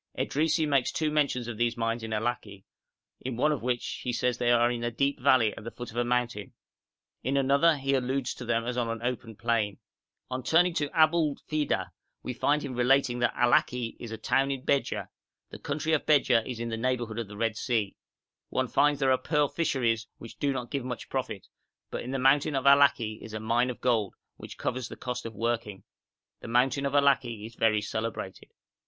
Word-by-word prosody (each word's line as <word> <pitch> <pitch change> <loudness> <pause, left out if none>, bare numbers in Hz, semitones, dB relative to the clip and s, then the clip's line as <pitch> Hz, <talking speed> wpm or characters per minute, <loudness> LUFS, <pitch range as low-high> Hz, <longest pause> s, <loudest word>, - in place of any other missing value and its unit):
Edrisi 155 +2 +1
makes 140 -3 +2
two 155 -1 -1
mentions 140 -5 0
of 120 -2 -5
these 120 +1 0
mines 115 0 -1
of 110 - -6
Allaki, 110 -3 -3 0.6
in 125 -2 -5
one 150 +5 +3
of 150 - -2
which 125 0 -2
he 125 - -2
says 125 0 0
they 120 - +1
are 120 0 +4
in 120 -1 -3
a 120 - 0
deep 140 +4 0
valley 125 -5 +4
at - - -10
the 115 - -5
foot 120 -1 -8
of - - -15
a 120 - +2
mountain; 120 -3 -1 0.7
in 135 +1 0
another 140 +4 +4
he 135 0 -1
alludes 130 0 0
to - - -9
them 115 -1 0
as 125 0 -3
on 120 -2 0
an 115 0 -4
open 120 -2 -3
plain. 110 -3 0 0.5
On 130 0 -2
turning 175 +6 +3
to 150 -3 -1
Abu'lfida, 155 -2 +1 0.3
we 125 - -4
find 145 +4 +1
him 140 -3 -5
relating 125 0 +2
'that 120 -1 +1
Allaki 120 -1 +2
is 120 - -7
a 110 - -5
town 135 +5 +1
of 135 -2 -3
Bedja; 140 -1 0 0.4
the - - -9
country 155 +2 -2
of 155 - 0
Bedja 130 -6 +4
is 125 -3 -5
in 115 0 -3
the 115 - -3
neighbourhood 120 -2 -1
of 115 - -4
the 100 0 -10
Red 115 0 0
Sea. 110 -4 -1 0.5
One 130 -1 -1
finds 145 +1 +3
there 135 -2 +4
pearl 150 -3 +1
fisheries 120 -8 0
which 115 - -12
do 145 -1 +1
not 125 -3 -4
give 140 -3 -2
much 125 -1 -6
profit, 115 -7 -3 0.5
but - - -3
in 125 - -7
the 135 - -1
mountain 140 +3 +3
of 135 - -1
Allaki 140 -6 +4
is 110 -1 -8
a - - -3
mine 120 +3 +1
of 125 - -5
gold, 115 -5 +1 0.2
which - - -10
covers 125 -2 -3
the - - -8
cost 125 -2 -4
of 115 - -10
working. 115 -3 -2 0.6
The - - -9
mountain 130 +4 +2
of 140 - -4
Allaki 135 -6 +2
is 115 - -9
very 110 -2 +2
celebrated.' 110 -3 -5
125 Hz, 210 wpm, -28 LUFS, 115-140 Hz, 0.7 s, are